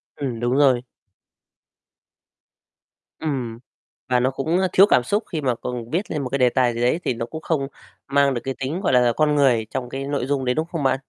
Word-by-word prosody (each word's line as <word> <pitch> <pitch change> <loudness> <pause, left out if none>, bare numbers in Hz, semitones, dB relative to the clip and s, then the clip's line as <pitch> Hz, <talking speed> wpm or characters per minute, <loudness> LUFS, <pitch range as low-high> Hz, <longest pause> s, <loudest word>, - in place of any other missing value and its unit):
Ừm, 125 -5 -4
đúng 120 +1 0
rồi. 130 -4 +4 2.4
Ừm, 125 -7 -3 0.5
và 125 - +3
nó 130 +2 +1
cũng, 155 +6 -1
ơ, 190 - +2
thiếu 195 - +8
cảm 125 - +4
xúc 205 - 0
khi 160 - -2
mà 125 -4 0
còn 120 -1 -6
viết 180 +8 -2
lên 150 -3 -2
một 130 - -4
cái 140 - -1
đề 125 -2 +4
tài 120 -1 +2
gì 115 - -4
đấy 125 +8 +2
thì - - 0
nó 115 0 -4
cũng 160 +6 -8
không 150 -4 -1 0.4
mang 140 0 +3
được 120 - -3
cái 135 - -3
tính, 150 +8 -3
gọi 175 - +1
là, 125 -1 +4
con 150 -1 +2
người 125 -6 +3
trong 125 -2 -4
cái 135 +1 -5
nội 140 -2 -2
dung 135 -1 -1
đấy, 125 0 +1
đúng 155 - 0
không 165 -5 -3
bạn? 130 0 +2
135 Hz, 225 wpm, -22 LUFS, 125-150 Hz, 2.4 s, thiếu